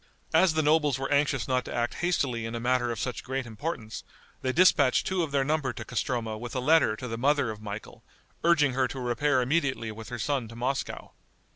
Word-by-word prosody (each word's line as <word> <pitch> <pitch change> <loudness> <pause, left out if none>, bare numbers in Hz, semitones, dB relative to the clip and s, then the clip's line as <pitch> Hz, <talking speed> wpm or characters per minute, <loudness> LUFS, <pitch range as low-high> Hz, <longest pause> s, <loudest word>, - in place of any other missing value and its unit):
As 180 -4 +4
the 155 - +2
nobles 150 -3 +3
were 135 +1 -4
anxious 140 -3 +1
not 130 -1 +1
to - - -6
act 120 0 0
hastily 130 -10 0
in 115 - -5
a - - -3
matter 120 0 +1
of 115 - -4
such 125 - -3
great 130 0 -3
importance, 115 -1 -5 0.4
they 130 - 0
dispatched 145 -4 +4
two 190 -1 0
of 160 -4 -2
their 140 -1 +2
number 145 -3 0
to 110 - -7
Castroma 115 -2 -2
with 120 +2 -7
a - - +1
letter 140 -4 +4
to 125 - -7
the 115 -1 -4
mother 140 -2 +2
of 105 -1 -9
Michael, 105 0 -8 0.4
urging 150 -6 +4
her 130 0 +2
to 130 - -7
repair 125 +2 +1
immediately 135 -5 0
with 110 0 -9
her 120 - -4
son 130 +1 -1
to 115 - -11
Moscow. 130 +3 -3
130 Hz, 220 wpm, -28 LUFS, 115-145 Hz, 0.4 s, As